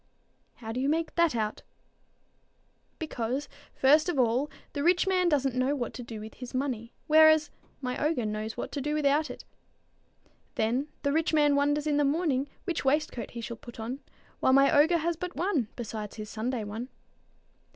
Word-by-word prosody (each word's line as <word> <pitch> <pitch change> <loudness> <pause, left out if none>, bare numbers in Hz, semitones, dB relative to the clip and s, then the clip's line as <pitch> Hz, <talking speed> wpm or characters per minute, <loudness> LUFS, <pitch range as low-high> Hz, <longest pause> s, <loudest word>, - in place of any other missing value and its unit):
"How 225 -2 -7
do 240 - -3
you 270 +2 +1
make 325 +1 0
that 335 -6 +3
out?" 215 -2 -2 1.4
"Because, 270 -2 -3 0.3
first 300 +6 +4
of 345 - -1
all, 250 +3 +2 0.2
the 285 - -2
rich 350 +4 +3
man 365 -2 +2
doesn't 275 -4 +1
know 255 +3 +1
what 240 -5 -3
to - - -7
do 230 -2 -7
with 215 +1 -9
his 250 0 -9
money, 255 -4 -3
whereas 315 0 +6 0.3
my 250 +1 -2
ogre 300 -6 +1
knows 215 +1 -3
what - - -4
to 285 - -3
do 295 +2 -1
without 300 +1 +2
it. - - -9 1.1
Then 245 +6 0 0.2
the 280 -1 +1
rich 320 0 +1
man 295 -2 +4
wonders 290 +1 +2
in 295 -1 +1
the 295 - +3
morning 285 -2 +1
which 350 -4 -2
waistcoat 275 -4 0
he - - -4
shall 230 0 -6
put 240 +1 -12
on, 240 +5 -4 0.4
while 260 - +3
my 275 +3 +5
ogre 320 +4 +5
has 335 +1 -1
but 360 +1 -5
one, 325 - 0
besides 215 -3 -6
his 215 -1 -7
Sunday 230 +1 -2
one. 220 +5 -6
275 Hz, 180 wpm, -29 LUFS, 235-305 Hz, 1.4 s, whereas